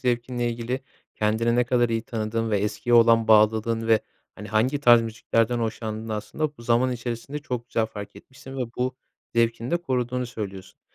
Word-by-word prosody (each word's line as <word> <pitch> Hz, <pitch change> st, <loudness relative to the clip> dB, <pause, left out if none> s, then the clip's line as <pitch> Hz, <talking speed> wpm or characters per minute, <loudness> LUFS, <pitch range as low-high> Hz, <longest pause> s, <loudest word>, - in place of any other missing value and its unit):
zevkinle 120 Hz, -1 st, -1 dB
ilgili 120 Hz, +3 st, -3 dB, 0.3 s
kendini 110 Hz, +2 st, +1 dB
ne 125 Hz, -, +3 dB
kadar 120 Hz, -1 st, +2 dB
iyi 115 Hz, -1 st, -1 dB
tanıdığın 115 Hz, 0 st, -2 dB
ve 105 Hz, -, +2 dB
eskiye 105 Hz, +4 st, 0 dB
olan 115 Hz, -1 st, +5 dB
bağlılığın 110 Hz, +1 st, +4 dB
ve, 110 Hz, -1 st, +5 dB, 0.3 s
hani, 105 Hz, +1 st, -9 dB
hangi 125 Hz, +7 st, +1 dB
tarz 120 Hz, -3 st, +7 dB
müziklerden 115 Hz, +1 st, 0 dB
hoşlandığını 110 Hz, -1 st, -3 dB
aslında 145 Hz, +8 st, -3 dB
bu 115 Hz, -, -13 dB
zaman 120 Hz, +2 st, +2 dB
içerisinde 120 Hz, +4 st, -5 dB
çok 125 Hz, -5 st, -5 dB
güzel 110 Hz, -1 st, 0 dB
fark 105 Hz, -2 st, -9 dB
etmişsin 135 Hz, +4 st, -12 dB
ve 130 Hz, -, -1 dB
bu 125 Hz, +1 st, -1 dB, 0.4 s
zevkini 115 Hz, +1 st, +1 dB
de 170 Hz, -, +3 dB
koruduğunu 125 Hz, -6 st, -2 dB
söylüyorsun. 100 Hz, -5 st, -8 dB
115 Hz, 170 wpm, -25 LUFS, 110-125 Hz, 0.4 s, tarz